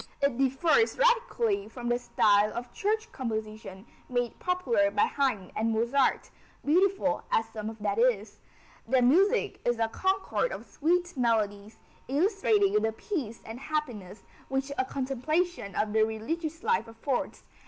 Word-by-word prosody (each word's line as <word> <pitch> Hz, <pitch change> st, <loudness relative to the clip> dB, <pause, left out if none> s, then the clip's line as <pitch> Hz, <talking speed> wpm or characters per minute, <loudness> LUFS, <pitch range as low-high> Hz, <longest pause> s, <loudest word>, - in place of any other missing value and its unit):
It 280 Hz, -3 st, +1 dB
differs 295 Hz, -, +2 dB
radically 475 Hz, -4 st, +2 dB
from 245 Hz, -3 st, -7 dB
the 240 Hz, 0 st, +1 dB
style 210 Hz, -3 st, +3 dB
of 240 Hz, 0 st, -6 dB
church 440 Hz, +2 st, -1 dB
composition 220 Hz, -4 st, -5 dB, 0.2 s
made 245 Hz, -2 st, -2 dB
popular 250 Hz, -, +1 dB
by 205 Hz, +1 st, +2 dB
Haydn 250 Hz, -10 st, -1 dB
and 225 Hz, +1 st, 0 dB
Mozart, 235 Hz, +5 st, +1 dB, 0.3 s
beautiful 350 Hz, -2 st, +2 dB
as 225 Hz, -, +2 dB
some 215 Hz, 0 st, -4 dB
of 220 Hz, -, -9 dB
that 205 Hz, +1 st, 0 dB
is. 220 Hz, -4 st, +1 dB, 0.5 s
Their 255 Hz, +1 st, +3 dB
music 385 Hz, -, +3 dB
is 240 Hz, -1 st, +1 dB
a 225 Hz, -1 st, 0 dB
concord 385 Hz, -, 0 dB
of -, -, -7 dB
sweet 350 Hz, +3 st, 0 dB
melodies, 215 Hz, -4 st, 0 dB, 0.3 s
illustrating 395 Hz, -, +2 dB
the 220 Hz, +1 st, +1 dB
peace 235 Hz, -, -5 dB
and 225 Hz, +2 st, -8 dB
happiness 250 Hz, -11 st, -4 dB, 0.3 s
which 270 Hz, +1 st, -2 dB
a 260 Hz, -, 0 dB
contemplation 275 Hz, -, -2 dB
of 210 Hz, 0 st, 0 dB
the 220 Hz, -, +3 dB
religious 315 Hz, -, -3 dB
life 460 Hz, -, +1 dB
affords. 225 Hz, +4 st, -3 dB
255 Hz, 145 wpm, -28 LUFS, 220-345 Hz, 0.5 s, style